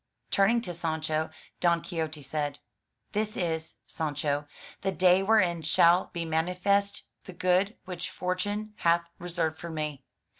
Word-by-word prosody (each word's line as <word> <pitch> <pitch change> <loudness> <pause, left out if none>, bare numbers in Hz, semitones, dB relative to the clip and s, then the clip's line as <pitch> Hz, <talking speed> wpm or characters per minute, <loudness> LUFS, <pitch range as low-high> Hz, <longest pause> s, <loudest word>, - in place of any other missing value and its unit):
Turning 215 +4 +4
to 180 -7 -4
Sancho, 160 -1 -1 0.3
Don 170 -1 +3
Quixote 160 -4 -4
said, 145 +1 -2 0.5
"This 215 0 -1
is, 160 -2 -2
Sancho, 145 -1 -2 0.3
the 195 - 0
day 185 0 +5
wherein 190 -5 +3
shall 170 +3 +4
be 170 -2 -2
manifest 180 +5 +1 0.2
the 185 - -9
good 185 +4 +2
which 180 -2 -5
fortune 205 +4 -2
hath 170 0 +3 0.2
reserved 165 -2 -2
for 170 - -6
me. 150 -3 -3
170 Hz, 135 wpm, -29 LUFS, 160-185 Hz, 0.5 s, day